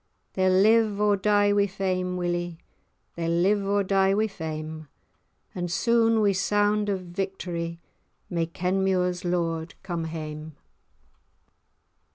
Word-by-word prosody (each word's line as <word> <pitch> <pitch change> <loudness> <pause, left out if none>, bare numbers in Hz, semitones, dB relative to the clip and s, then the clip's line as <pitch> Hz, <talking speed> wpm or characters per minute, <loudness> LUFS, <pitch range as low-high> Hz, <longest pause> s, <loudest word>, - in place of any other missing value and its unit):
They'll 185 0 +2
live, 210 +2 +4
or 210 -1 +3
die 205 +1 +3
wi' 205 0 +3
fame, 185 -1 -2
Willie, 175 -1 -2 0.6
They'll 165 -1 -3
live, 190 +5 +2
or 200 +1 +1
die 195 0 +2
wi' 215 +1 +2
fame, 155 -5 -6 0.7
And 175 -1 -4
soon 230 +3 +3
wi' 205 -1 +4
sound 205 +2 +1
o' 195 - +1
victorie 175 -2 -4 0.5
May 170 -2 -1
Kenmure's 180 +1 0
lord 170 -2 -2
come 170 -3 -3
hame." 155 -1 -6
185 Hz, 120 wpm, -26 LUFS, 170-205 Hz, 0.7 s, live